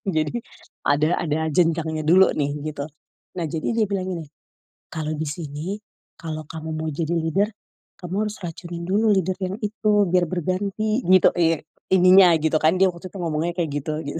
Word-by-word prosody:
Jadi, 155 +9 0 0.5
ada 150 +4 +2
ada 155 -1 -1
jenjangnya 160 -1 +1
dulu 185 +3 +6
nih, 145 -1 -1 0.2
gitu. 145 0 -5 0.5
Nah, 175 - -2
jadi 160 - -3
dia 225 - +3
bilang 195 -2 -2
gini, 165 -2 -6 0.6
"Kalau 155 -1 -4
di 160 - -2
sini, 150 +1 -5 0.5
kalau 155 -2 -6
kamu 160 +1 -7
mau 160 0 -2
jadi 160 +1 -3
leader, 180 +6 +1 0.5
kamu 175 0 -7 0.2
harus 210 - -9
racunin 170 -1 -7
dulu 210 +4 +2
leader 190 -3 +2
yang 185 +2 -2
itu, 210 -1 +1
biar 175 -2 +1
berganti," 200 - -1
gitu. 185 -1 +6
Iya 165 -2 +2 0.3
ininya 185 -1 +7
gitu 155 0 +1
kan, 160 +3 +3
dia 190 0 +4
waktu 170 +2 -10
tuh 195 - -10
ngomongnya 165 +1 -1
kayak 165 -4 -1
gitu, 155 +2 -3
gitu. 145 +3 -4
170 Hz, 175 wpm, -23 LUFS, 155-185 Hz, 0.6 s, ininya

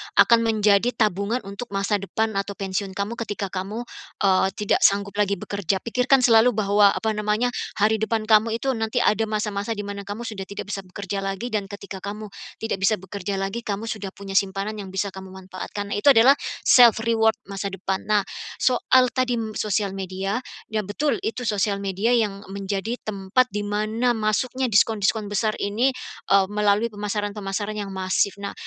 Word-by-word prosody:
akan 235 -1 +6
menjadi 215 +1 +3
tabungan 210 +3 0
untuk 200 +5 -7
masa 200 +1 +1
depan 220 +3 -1
atau 200 0 -2
pensiun 190 0 -3
kamu 200 +4 -3
ketika 200 -1 -3
kamu, 195 +5 -4 0.4
eee, 190 -1 +4
tidak 210 -1 +1
sanggup 200 0 +2
lagi 200 -1 +2
bekerja. 195 0 -2
Pikirkan 250 +3 +3
selalu 235 0 +6
bahwa 205 -1 +4
apa 220 - -1
namanya, 210 +3 +1 0.3
hari 220 +1 +3
depan 220 0 0
kamu 220 +1 +4
itu 270 - +1
nanti 225 0 0
ada 220 +1 +2
masa-masa 210 0 -2
di 205 - -4
mana 200 0 -6
kamu 205 +3 -5
sudah 195 -3 -6
tidak 200 +1 -7
bisa 195 -2 -4
bekerja 195 +1 -5
lagi 195 +5 -3
dan 210 -4 -1
ketika 200 0 -8
kamu 210 +1 -6 0.3
tidak 225 -3 -2
bisa 215 +2 +3
bekerja 200 +1 -5
lagi, 195 +4 -3
kamu 210 +2 -3
sudah 205 -3 -5
punya 195 -1 -3
simpanan 195 +2 0
yang 195 -2 -8
bisa 195 +1 -1
kamu 190 0 -10
manfaatkan 190 +2 -7
itu 205 +1 -3
adalah 255 +4 +6 0.2
self 240 -3 +6
reward 225 -1 +3 0.2
masa 195 0 -4
depan. 190 0 -3
Nah 210 -1 +3 0.4
soal 255 0 +4
tadi 240 -4 -1
sosial 210 -1 0
media 190 +2 -3 0.3
ya 215 -2 -2
betul 280 +9 0
itu 225 +3 -3
sosial 200 -1 0
media 200 +4 0
yang 210 -4 0
menjadi 200 +4 -4
tempat 210 +5 0
di 205 0 -3
mana 215 +4 0
masuknya 240 +4 0
diskon-diskon 215 0 +2
besar 215 +1 0
ini, 220 +6 +1 0.4
eee, 195 -1 +5
melalui 210 +2 +1
pemasaran-pemasaran 205 0 -3
yang 205 -2 -4
masif. 190 +1 0
Nah 200 0 -5
205 Hz, 170 wpm, -23 LUFS, 195-220 Hz, 0.4 s, akan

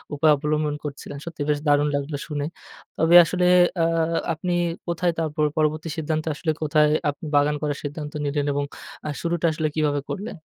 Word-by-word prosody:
উপায় 155 +1 +4
অবলম্বন 150 0 -1
করছিলেন। 145 -1 -7
সত্যিই 160 -4 -5
বেশ 145 -1 +2
দারুণ 145 0 +4
লাগলো 145 +1 -2
শুনে। 145 -2 -3 0.5
তবে 165 +2 +4
আসলে 180 +1 0 0.4
আ - - +4 0.5
আপনি 175 +3 -2 0.3
কোথায় 170 +1 +1
তার 160 -2 0
পর 150 - +3
পরবর্তী 155 +1 0
সিদ্ধান্ত 155 0 -1 0.2
আসলে 160 0 -1
কোথায় 150 0 +3 0.2
আপনি 145 +4 -6
বাগান 145 +1 +3
করার 145 -2 -1
সিদ্ধান্ত 150 0 -5
নিলেন? 145 0 -1
এবং 145 0 0 0.4
আ - - -2
শুরুটা 170 0 -1
আসলে 155 0 -1
কিভাবে 150 -2 +1
করলেন? 200 0 -5
150 Hz, 170 wpm, -24 LUFS, 145-160 Hz, 0.5 s, উপায়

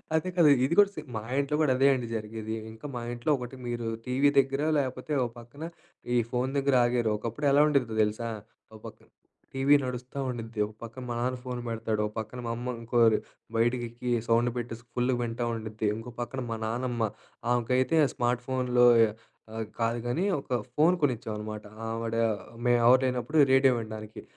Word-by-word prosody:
అదే 160 +3 +1
కదా! 165 -4 +7 0.2
ఇది 145 - 0
కూడా 205 -1 +7
సేమ్. 150 -3 -8
మా - - -4 0.2
ఇంట్లో 140 +1 0
కూడా 150 -4 +3
అదే 135 +1 +5
అండి 125 -3 -2
జరిగేది. 110 0 -4 0.2
ఇంకా 110 +5 -13
మా 120 - -3
ఇంట్లో 120 +5 -1
ఒకటి 125 0 -7
మీరు 120 -1 -3 0.2
టీవీ 130 +3 +3
దగ్గర 135 +1 +1 0.2
లేపోతే, 130 +1 -4
ఓ - - +1
పక్కన 120 +6 -11 0.5
ఈ - - +5
ఫోన్ 125 +1 0
దగ్గర 140 -1 +2
ఆగారు. 120 -2 +1
ఒకప్పుడెలా 140 +6 +2
ఉండేదో 130 -7 +1
తెలుసా? 110 +2 -2 0.4
ఓ - - -10
పక్కన - - -11 0.5
టీవీ 135 +2 +4
నడుస్తా 125 +2 -5
ఉండుద్ది. 115 -2 -6
ఒక 105 - -10
పక్కన 115 +3 -8
మా 120 - -2
నాన్న 125 +1 -1
ఫోన్ 125 -1 -4
పెడతాడు. 110 -1 -1
ఒక 105 - -9
పక్కన 110 +3 -6
మా - - -1
అమ్మ 120 +2 -4
ఇంకోరు 115 -1 +4 0.4
బయటికెళ్ళి 120 +1 0 0.2
సౌండ్ 115 +1 +3
పెట్టేసి 120 -1 -5
ఫుల్‌గా 125 0 +1
వింటా 120 0 -2
ఉండుద్ది. 110 -1 -3
ఇంకో 115 +2 -7
పక్కన 130 +2 -4
మా - - -1
నాన్నమ్మ, 120 +1 -1 0.5
ఆమెకైతే 125 +4 +2
ఆ - - +2
స్మార్ట్ 120 0 0
ఫోన్‌లో 125 -2 +3 0.7
ఆహ్, 110 0 -3
కాదు 115 +1 +1
గానీ 150 +10 0 0.2
ఒక 140 - -14 0.3
ఫోన్ 165 +4 +5
కొనిచ్చామనమాట. 110 -5 -2 0.2
ఆవిడ 115 0 -3 0.5
మేమెవరు 120 +1 +5
లేనప్పుడు 125 +4 -1
రేడియో 135 0 +6
వినడానికి. 110 -1 -7
120 Hz, 170 wpm, -28 LUFS, 115-130 Hz, 0.7 s, కదా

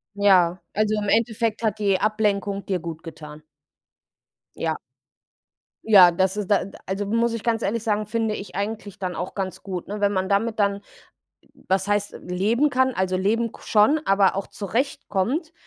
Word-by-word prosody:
Ja, 185 -3 +4
also, 215 0 +1
im 205 - -2
Endeffekt 225 0 +1
hat 215 -1 0
die 200 -3 +2
Ablenkung 205 -2 0
dir 190 -2 -1
gut 165 -1 -7
getan. 155 -2 -10 1.2
Ja. - - -1 1.1
Ja, 190 -5 +8
das 190 +3 0
ist 205 -3 -3
da 205 - +4
äh, - - -6
d - - -12
also, 195 +2 -3
muss 230 +3 +1
ich 230 - -5
ganz 230 -1 0
ehrlich 220 +2 -1
sagen, 215 -2 0
finde 220 0 -1
ich 200 -4 -8
eigentlich 205 0 -4
dann 185 -2 -3
auch 180 - -5
ganz 190 -2 -4
gut, 185 -3 -5
ne, 205 +1 -5
wenn 200 0 +3
man 190 -1 -1
damit 220 +3 0
dann, 200 -1 +1 0.9
was 190 +1 +1
heißt 205 0 -1
leben 215 +11 +1
kann, 260 -1 +2
also, 185 -2 0
leben 225 +5 0
k - - -15
schon, 220 +9 +4
aber 195 -1 +3
auch 195 - -3
zurechtkommt, 240 - -2
205 Hz, 175 wpm, -23 LUFS, 190-220 Hz, 1.2 s, Ja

